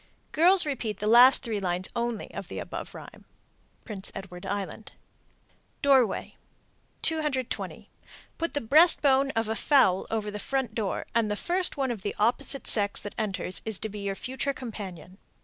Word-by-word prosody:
_ - - -38
Girls 355 +3 +6
repeat 240 -7 -3
the 210 - -5
last 245 +5 +7
three 225 -4 -3
lines 180 -1 -1
only 235 -2 -3
of - - -7
the - - -8
above - - -7
rhyme. - - -12 0.6
Prince 205 -4 -7
Edward 180 -2 -9
Island. 205 +2 -5 0.9
DOORWAY. 265 -7 +2 0.7
220. 300 -6 -2 0.5
Put 335 -1 -3
the 290 - 0
breast 310 +11 +6
bone 275 -1 +3
of 225 -1 0
a 220 - -2
fowl 200 -6 +3
over 215 -2 -3
the 210 - -6
front 265 0 -2
door, 215 -4 -3
and 230 -2 +1
the 210 - -1
first 355 - 0
one 265 -2 -1
of 225 -5 -6
the 205 - -4
opposite 240 +5 0
sex 205 -2 +3
that 205 - -7
enters 195 -3 -3
is 220 -3 0
to 220 - -4
be 210 0 -8
your 200 -1 -3
future 265 +5 -3
companion. 195 - -9
225 Hz, 170 wpm, -27 LUFS, 205-270 Hz, 0.9 s, last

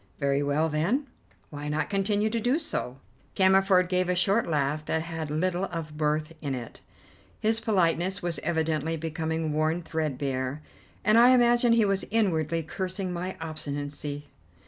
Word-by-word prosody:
Very 140 0 +1
well, 145 +3 +1
then, 170 - 0 0.5
why 145 0 -5
not 150 +6 -1
continue 205 +2 +1
to 230 - 0
do 245 +6 +2
so?" 220 - -3 0.4
Cammerford 190 -1 +4
gave 180 0 0
a 180 - +2
short 200 +5 +2
laugh 150 -1 0
that 160 +1 -1
had 160 -2 -5
little 180 +4 0
of 165 -4 -6
mirth 155 +1 -1
in 140 -3 -2
it: 120 -2 -8 0.6
his 220 +1 +1
politeness 185 -2 +1
was 175 -2 -3
evidently 160 -1 -1
becoming 160 0 -2
worn 155 +3 0
threadbare, 140 -3 -2 0.4
and 215 +1 +6
I 240 +1 +8
imagine 240 -1 +5
he 230 -2 +4
was 195 -1 +1
inwardly 165 -7 +1
cursing 185 +2 -4
my 180 +2 -4
obstinacy. 145 -2 -5
165 Hz, 150 wpm, -27 LUFS, 150-195 Hz, 0.6 s, I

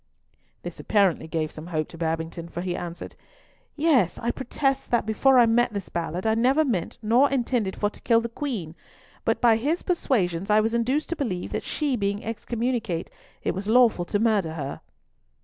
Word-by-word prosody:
This 175 -1 -7
apparently 195 -6 +2
gave 160 -1 -2
some 155 +2 -9
hope 155 -3 -2
to 165 - -11
Babington, 165 +1 -3
for 175 - -5
he 180 -1 -2
answered—"Yes, 265 - -2
I 235 - -1
protest 270 +1 -1
that, 235 -3 +2
before 255 +5 +4
I 240 - +7
met 230 0 +2
this 200 -2 -5
Ballard, 170 +2 -3
I 220 - +3
never 260 +7 +3
meant 205 - -2
nor 240 +6 +4
intended 240 -6 0
for 205 0 0
to - - -16
kill 230 -1 +4
the 230 - -3
Queen; 230 - -4 0.5
but - - +1
by 230 -2 +5
his 300 +9 -1
persuasions 195 - 0
I 210 0 +5
was 225 +1 +1
induced 255 +6 0
to 340 - -1
believe 225 - -3
that - - -2
she 290 -4 -1
being 200 -2 -2
excommunicate 230 -5 -2 0.3
it - - 0
was 190 +3 -5
lawful 225 -6 +4
to 205 - 0
murder 205 -7 +1
her." 140 -3 -5
220 Hz, 185 wpm, -25 LUFS, 175-250 Hz, 0.5 s, I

